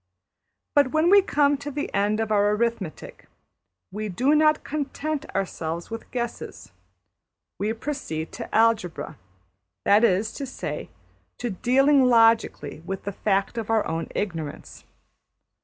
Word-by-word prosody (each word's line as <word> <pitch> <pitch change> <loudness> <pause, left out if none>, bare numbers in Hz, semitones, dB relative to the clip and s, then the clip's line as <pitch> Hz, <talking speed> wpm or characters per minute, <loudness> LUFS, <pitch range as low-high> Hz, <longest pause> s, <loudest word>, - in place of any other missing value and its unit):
But 285 -3 +4
when 315 +3 +3
we 400 0 +8
come 290 -6 +2
to 285 +1 -6
the 290 +1 -4
end 205 +2 +1
of 220 -1 -1
our 205 -1 +3
arithmetic 225 -7 -4 0.6
we 210 +2 -4
do 255 +11 +2
not 305 0 +4
content 305 +1 -3
ourselves 170 -2 -3
with 225 0 -7
guesses; 240 -1 -5 0.9
we 210 +2 0
proceed 225 - -5
to - - -7
algebra 215 -9 +1 0.7
that 205 +3 +5
is 210 -1 +2
to 275 - -5
say, 255 - -5 0.5
to 240 -2 -3
dealing 265 +7 +4
logically 225 - +3
with 190 +3 -6
the 200 - -3
fact 200 +3 0
of 225 - -6
our 225 -1 +2
own 165 +1 -3
ignorance. 165 -7 -5
225 Hz, 135 wpm, -25 LUFS, 195-275 Hz, 0.9 s, we